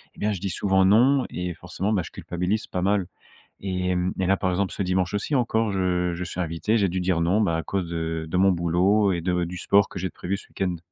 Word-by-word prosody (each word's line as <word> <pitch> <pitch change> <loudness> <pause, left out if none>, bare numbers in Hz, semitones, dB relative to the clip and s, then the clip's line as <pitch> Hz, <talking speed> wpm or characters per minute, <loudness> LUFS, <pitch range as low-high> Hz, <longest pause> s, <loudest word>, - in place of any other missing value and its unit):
Et - - -16
bien 105 - +1
je 100 - -3
dis 100 - -2
souvent 95 +1 +2
non 125 +7 +4
et 90 0 -4
forcément, 100 +5 -3
ben, 100 - +2
je 85 - -8
culpabilise 90 +5 -2
pas 90 - -3
mal. 100 0 +1 0.6
Hem 90 -1 -1
et 95 - +1
là 95 +1 +3
par 95 -1 0
exemple 95 +1 0
ce 100 - -3
dimanche 90 +1 0
aussi 105 +8 -2
encore, 115 -3 +1
je 90 -2 0
je 85 +1 -4
suis 90 0 -6
invité, 85 +6 0
j'ai 100 -3 +2
dû 95 +2 -2
dire 90 -2 +1
non, 90 +6 +2
bah, 85 -6 +1
à 80 - -3
cause 90 +1 -3
de 80 -1 -3
de 90 - -1
mon 95 +1 +5
boulot 90 +4 +2
et 85 - -2
de 90 0 0
du 90 +2 -6
sport 100 +3 +3
que - - -8
j'ai 95 0 -3
prévu 100 +3 -3
ce - - -14
week-end. 90 -2 -2
95 Hz, 255 wpm, -25 LUFS, 90-100 Hz, 0.6 s, mon